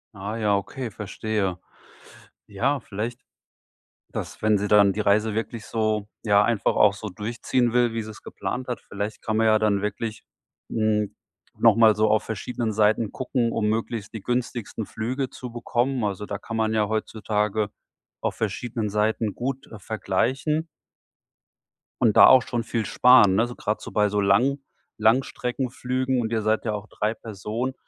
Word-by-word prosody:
Ah 100 +3 -5
ja, 105 -2 +2
okay, 120 +5 -4
verstehe. 100 -2 -3 0.9
Ja, 130 +8 0
vielleicht 115 +4 -5 0.9
dass, - - -6
wenn 110 -1 +3
sie 105 +1 -2
dann 100 -1 +6
die 105 - -3
Reise 105 +1 +2
wirklich 110 0 -4
so, 110 -2 -1 0.2
ja, 105 -1 +4
einfach 115 -2 +1
auch 105 -2 +6
so 105 +2 -7
durchziehen 115 +4 -1
will, 120 -2 +2
wie 115 - -1
sie 110 - -8
es 105 - -12
geplant 125 0 -5
hat. 125 - -3
Vielleicht 105 +1 -5
kann 110 -1 -1
man 110 - +3
ja 110 0 +5
dann 105 -2 +2
wirklich, 105 +2 -4 0.5
hm, 110 -2 0 0.4
noch 115 -3 +5
mal 110 -2 +6
so 110 +1 +3
auf 110 - +3
verschiedenen 115 +1 -3
Seiten 110 0 +2
gucken, 125 -2 -1
um 105 -2 0
möglichst 110 -1 -3
die 110 - -6
günstigsten 120 -3 -2
Flüge 125 +6 -3
zu 125 - -8
bekommen. 120 +1 -1
Also 100 0 -3
da 100 - -4
kann 115 +2 -6
man 110 0 +1
ja 105 -1 +2
heutzutage 105 -1 -1 0.5
auf - - -1
verschiedenen 115 -3 -2
Seiten 105 0 0
gut, 135 +2 -4
äh, 110 - -8
vergleichen 130 - -1 1.4
und 115 -4 +4
da - - +10
auch 130 -1 +8
schon 120 -1 -2
viel 115 -2 -2
sparen, 120 -6 +6
ne, 115 +4 +3
so 120 - -8
grad 105 +1 -2
so - - -8
bei 105 0 +2
so 105 0 0
Lang 120 +9 +3 0.4
Langstreckenflügen. 125 +2 0
Und 110 -1 -3
ihr 110 -1 0
seid 110 +2 0
ja 110 - 0
auch 105 +1 -5
3 105 +1 -2
Personen, 115 +4 -4
110 Hz, 170 wpm, -24 LUFS, 105-120 Hz, 1.4 s, da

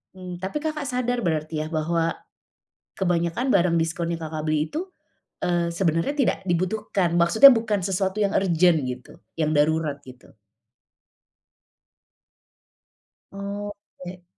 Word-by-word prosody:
Mmm, 180 -1 -8
tapi 190 +11 -4
Kakak 305 -2 -3
sadar 245 -3 -1
berarti, 155 -1 -1
ya, - - -6
bahwa 165 +1 0 0.8
kebanyakan 175 +7 0
barang 180 -4 +3
diskon 165 +1 -1
yang 165 - -8
Kakak 155 -1 -5
beli 155 0 0
itu, 345 +5 -4 0.6
eee, 175 -1 +1
sebenarnya 170 - 0
tidak 275 -4 +1
dibutuhkan? 185 0 0
Maksudnya 220 +11 +8
bukan 220 -5 0
sesuatu 190 +2 0
yang 200 - +1
urgen, 175 -3 +3
gitu, 125 0 -8 0.2
yang 155 -2 0
darurat, 150 -1 +1
gitu. 130 -4 -16 3.0
Oke. 200 -2 -8
175 Hz, 115 wpm, -24 LUFS, 165-205 Hz, 3.0 s, Maksudnya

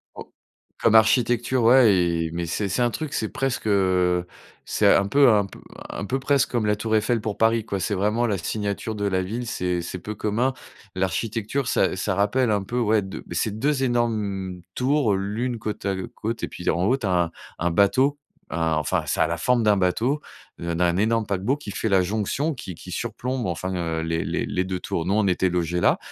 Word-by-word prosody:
Oh, - - -10 0.5
comme 115 -1 +3
architecture, 120 +2 +3
ouais 120 -2 +6
et 85 -2 0
mais 85 0 -2
c'est 100 +4 -2
c'est 110 +7 0
un 120 - +3
truc, 155 +4 -5
c'est 110 - -1
presque, 130 -4 -2
heu, 90 -3 +2 0.4
c'est - - +4
un 100 - +3
peu 140 +2 +5
un 105 -2 +3
peu - - -12 0.3
un 100 - -5
peu 135 +6 -1
presque 140 0 +1
comme 120 -3 0
la 105 - +2
tour 110 +1 0
Eiffel 115 +2 +2
pour 105 -2 -4
Paris, 110 0 +2
quoi. 100 -3 -3
C'est 105 +1 -1
vraiment 105 +5 +1
la 100 -3 0
signature 105 +4 -3
de 100 0 -2
la 95 -2 +1
ville, 115 +6 -4
c'est 90 -4 -1
c'est 90 +2 -6
peu 105 +4 -6
commun. 115 +6 0 0.4
L'architecture, 110 +7 -1
ça - - +2
ça 95 0 -1
rappelle 110 +4 +2
un 100 -2 +1
peu, 120 +5 -3
ouais, 110 -2 +3
2 95 0 -7
bah, 85 - -7
c'est 105 +4 -1
2 140 0 +1
énormes 105 -7 -1
tours, 130 -5 +2
l'une 110 +5 -2
côte 105 -1 -5
à 100 -1 0 0.2
côte 115 +2 -4
et - - 0
puis 90 - -4
en 85 - +1
haut, 125 +5 +3
tu 115 - -5
as - - 0
un 85 - -9 0.3
un 85 0 0
bateau. 130 +10 +3 0.3
Un, 80 -1 0
enfin, 75 -2 0
ça - - +2
a - - +1
la - - -2
forme 125 -2 +2
d'un 105 -1 +4
bateau, 115 +11 +1 0.4
de 85 0 -3
d'un 85 0 +2
énorme 110 +2 +1
paquebot 100 +9 0
qui 105 -8 -8
fait 110 - -2
la 95 -1 +4
jonction, 110 - -1
qui 95 - -8
qui - - -11
surplombe, 125 -2 -3
enfin, 90 +2 -3
heu, 80 -2 -2
les 80 0 -1
les - - -2
les 90 - -1
2 95 -1 -3
tours. 80 - -3
Nous, 100 - +2
on 110 - +2
était 95 0 +2
logés 90 0 -1
là. - - +4
105 Hz, 220 wpm, -24 LUFS, 95-120 Hz, 0.5 s, ouais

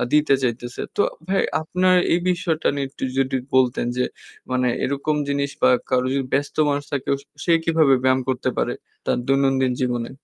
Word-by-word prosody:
দিতে 150 -2 +4
চাইতেছে। 120 0 -3 0.2
তো 205 - +4 0.3
ভাই 195 - +2 0.2
আপনার 185 +3 +2 0.2
এই 175 - +3
বিষয়টা 170 -3 0
নিয়ে 140 -1 -2
একটু 135 - -7
যদি 135 0 +1 0.2
বলতেন 130 -2 +3
যে 125 - +2 0.5
মানে 125 0 +1 0.2
এরকম 140 +2 -1
জিনিস 140 0 0
বা - - +6 0.2
কারো 130 0 +2
যদি 135 -1 0
ব্যস্ত 145 +1 -1
মানুষ 145 0 -1
থাকে 140 -2 -3 0.4
সে 170 - +3
কীভাবে 160 -4 +4
ব্যায়াম 130 0 +3
করতে 130 -1 0
পারে, - - 0 0.3
তার - - +1
দৈনন্দিন 135 -1 +2
জীবনে? 120 0 -2
135 Hz, 170 wpm, -22 LUFS, 130-150 Hz, 0.5 s, বা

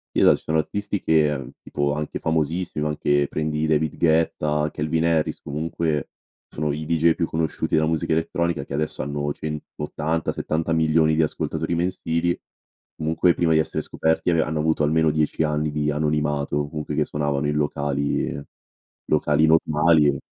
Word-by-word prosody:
eh, - - +3
dai, - - +7
sono 80 0 -1
artisti 100 +5 -1
che, 75 -2 +2
mhmm, 65 -3 -8
tipo 70 0 -1
anche 75 0 -3
famosissimi, 80 0 -1
anche, 75 -1 +1
prendi 75 0 -1
David 80 -1 +1
Guetta, 75 -2 +1
Calvin 80 +2 -1
Harris, 80 -2 +1
comunque, 75 0 -2 0.4
sono 75 0 -2
i 75 +1 -4
deejay 85 +1 +3
più 85 - -1
conosciuti 80 0 -1
della 80 0 +3
musica 80 0 0
elettronica, 85 +1 -1
che - - -8
adesso 75 -2 -2
hanno 75 +1 -2
180-70 80 +2 -3
milioni 80 0 +3
di 80 - +2
ascoltatori 80 +2 -1
mensili, 85 -1 0 0.6
comunque, 80 +2 +2
prima 85 -2 +1
di 80 - +4
essere 80 - -1
scoperti, 80 +2 0
ave 85 -1 +3
hanno 75 0 -2
avuto 80 0 +1
almeno 80 +1 +3
10 75 +1 0
anni 75 0 0
di 75 0 0
anonimato, 75 -1 0
o 75 0 -1
comunque 75 0 -4
che - - +1
suonavano, 75 -1 -1
in 75 - -1
locali 70 -1 -1 0.7
locali 75 0 +3
normali, 80 0 +4
e 70 -1 +1
75 Hz, 160 wpm, -23 LUFS, 75-80 Hz, 0.7 s, dai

